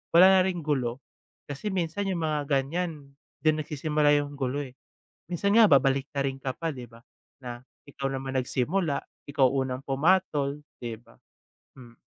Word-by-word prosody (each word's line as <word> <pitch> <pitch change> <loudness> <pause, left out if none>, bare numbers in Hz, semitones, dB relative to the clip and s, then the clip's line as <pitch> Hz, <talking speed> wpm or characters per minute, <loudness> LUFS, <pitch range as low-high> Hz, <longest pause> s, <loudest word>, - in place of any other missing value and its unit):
wala 185 +3 +9
na - - +5
ring 180 -3 -2
gulo. 130 -4 -1 0.5
Kasi 145 +9 -4
minsan 190 +1 -2
yung 170 -4 -1
mga 150 -2 -1
ganiyan, 145 +1 -2 0.3
diyan 155 0 +3
nagsisimula 150 0 +2
yung 145 0 -4
gulo 135 +2 -1
eh. 130 -2 -10 0.6
Minsan 200 +5 +2
nga 230 - +9
babaliktarin 135 -1 +2
ka 135 -1 -3
pa, 165 - -2
di 125 -1 -7
ba, 115 +1 -17 0.4
na 120 -1 -6 0.3
ikaw 135 -1 -3
naman 135 0 -3
nagsimula, 140 +5 0 0.3
ikaw 140 -3 +3
unang 130 -1 -2
pumatol 145 -1 +1 0.2
di 120 -2 -5
ba? - - -22 0.6
Hmm. 120 -3 -14
140 Hz, 155 wpm, -27 LUFS, 135-160 Hz, 0.6 s, wala